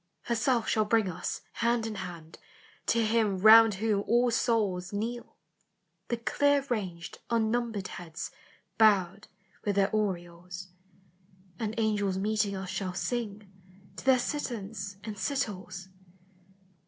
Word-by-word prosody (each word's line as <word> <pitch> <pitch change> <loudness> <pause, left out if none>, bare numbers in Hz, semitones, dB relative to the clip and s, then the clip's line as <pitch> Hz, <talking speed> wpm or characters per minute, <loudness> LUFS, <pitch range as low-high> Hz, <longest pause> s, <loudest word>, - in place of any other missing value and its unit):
"Herself 235 0 +1
shall 215 -1 +2
bring 220 -1 +3
us. 180 -2 -4
hand 235 -1 +1
in 225 - -3
hand, 175 -5 -8 0.5
To 230 -1 +3
Him 215 -3 +2
round 220 +2 +8
whom 205 0 0
all 240 +1 +3
souls 205 -6 +1
Kneel, 230 +4 -4 0.7
the 235 - -1
clear 285 +4 +2
ranged 180 -7 -3
unnumbered 225 -3 0
heads 170 -2 -7 0.5
Bowed 200 -3 +4 0.4
with 205 -2 0
their 195 0 +3
aureoles: 180 -2 -3 0.9
And 220 -1 -2
angels 205 -4 +1
meeting 210 0 0
us 190 -1 -5
shall 190 -1 -3
sing 215 -2 -3 0.5
To - - -7
their 265 -1 +6
citherns 220 -7 -4
and 215 -1 -5
citoles. 190 -8 -3
210 Hz, 120 wpm, -29 LUFS, 190-230 Hz, 0.9 s, round